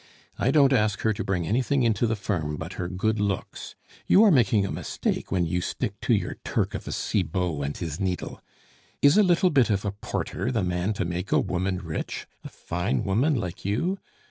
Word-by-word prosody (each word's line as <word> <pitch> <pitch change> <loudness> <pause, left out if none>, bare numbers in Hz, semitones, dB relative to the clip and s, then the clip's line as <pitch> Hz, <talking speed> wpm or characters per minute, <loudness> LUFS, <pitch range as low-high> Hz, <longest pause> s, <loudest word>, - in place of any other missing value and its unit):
"I 120 - +2
don't 140 -1 +5
ask 105 -5 +1
her 110 - +2
to - - -4
bring 95 -4 -1
anything 130 - +1
into 115 0 +2
the 110 - 0
firm 80 -8 -2
but 80 +4 -6
her 90 - -3
good 105 +4 -1
looks! 100 -2 -3 0.3
You 205 - +7
are 215 - +6
making 115 - +4
a - - -3
mistake - - -3
when 90 -2 +2
your 90 +2 -1
stick - - -3
to - - +3
your - - -3
Turk - - -1
of - - -6
a - - -3
Cibot 90 -6 -1
and 70 +1 -3
his 80 -1 -4
needle. 95 -3 -3 0.6
Is 140 +1 +7
a 210 - +7
little 180 -1 +3
bit 135 -6 +4
of 105 -1 0
a 100 - 0
porter 105 +4 -3
the 115 -6 0
man 90 +3 0
to 95 -3 -2
make 90 +2 -4
a - - +5
woman 95 +1 -1
rich 80 -4 -5 0.2
a - - -7
fine 90 +5 -2
woman 120 +10 +2
like 90 -7 -4
you? 165 - -1
100 Hz, 210 wpm, -26 LUFS, 90-120 Hz, 0.6 s, You